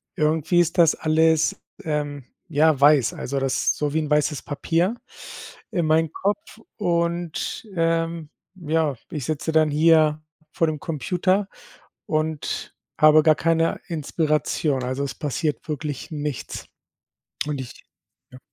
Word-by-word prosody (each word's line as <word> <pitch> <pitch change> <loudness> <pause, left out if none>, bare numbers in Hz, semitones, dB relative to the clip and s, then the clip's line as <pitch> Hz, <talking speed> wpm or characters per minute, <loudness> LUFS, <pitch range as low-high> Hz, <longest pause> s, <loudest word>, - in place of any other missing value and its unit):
irgendwie 155 +2 +2
ist 175 +1 +1
das 165 -3 +6
alles, 160 0 +2 0.2
ähm, 145 -3 -3 0.2
ja, 155 -2 +3
weiß, 140 -4 +5
also, 140 +1 -3
das 135 -1 0
ist - - +2
so 150 -1 -1
wie 160 - +2
'n 155 - -3
weißes 150 0 +1
Papier 165 +8 0 0.8
in 175 -6 0
meinem 160 0 +2
Kopf 210 - -3 0.2
und, 170 +1 -2
ähm, 165 -1 0 0.3
ja, 160 -5 0 0.2
ich 145 -5 -4
sitze 155 +2 -2
dann 155 -1 +3
hier 155 0 +4 0.3
vor 165 - +1
dem 155 -1 -2
Computer 185 +6 0 0.6
und 155 -1 -2 0.2
habe 155 0 +7
gar 155 -1 +5
keine 165 0 +1
Inspiration, 150 -3 -1
also, 130 +2 -2
es 140 - -4
passiert 150 0 -3
wirklich 150 +1 -4
nichts. 150 -4 -5 0.8
Und 145 -3 -2
ich 125 - -11 0.5
ja. 130 - -13
155 Hz, 135 wpm, -23 LUFS, 150-165 Hz, 0.8 s, habe